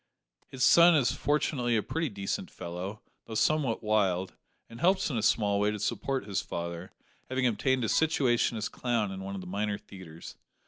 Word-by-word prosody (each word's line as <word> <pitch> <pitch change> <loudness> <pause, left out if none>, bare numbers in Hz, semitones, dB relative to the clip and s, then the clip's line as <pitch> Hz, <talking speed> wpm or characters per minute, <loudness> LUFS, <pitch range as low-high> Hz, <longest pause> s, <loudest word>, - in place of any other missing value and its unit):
His 130 -1 -4
son 170 0 +7
is 135 -5 +3
fortunately 130 -4 0
a 105 - 0
pretty 160 -1 -2
decent 100 -2 -4
fellow, 90 +5 -7 0.2
though 110 - -7
somewhat 125 +1 +1
wild, 95 -4 +1 0.3
and 115 - -12
helps 185 0 +2
in 125 - -2
a - - -1
small 105 -2 +2
way 105 +1 +2
to 105 - -2
support 130 +4 -2
his 100 -2 -1
father, 85 +1 -6 0.4
having 130 0 0
obtained 130 +2 +1
a - - 0
situation 130 -7 +2
as 110 +1 -2
clown 115 -6 -1
at 95 - -6
one 95 +1 -6
of 95 - -5
the - - -9
minor 100 +3 -2
theatres. 85 -4 -12
110 Hz, 185 wpm, -29 LUFS, 100-130 Hz, 0.4 s, son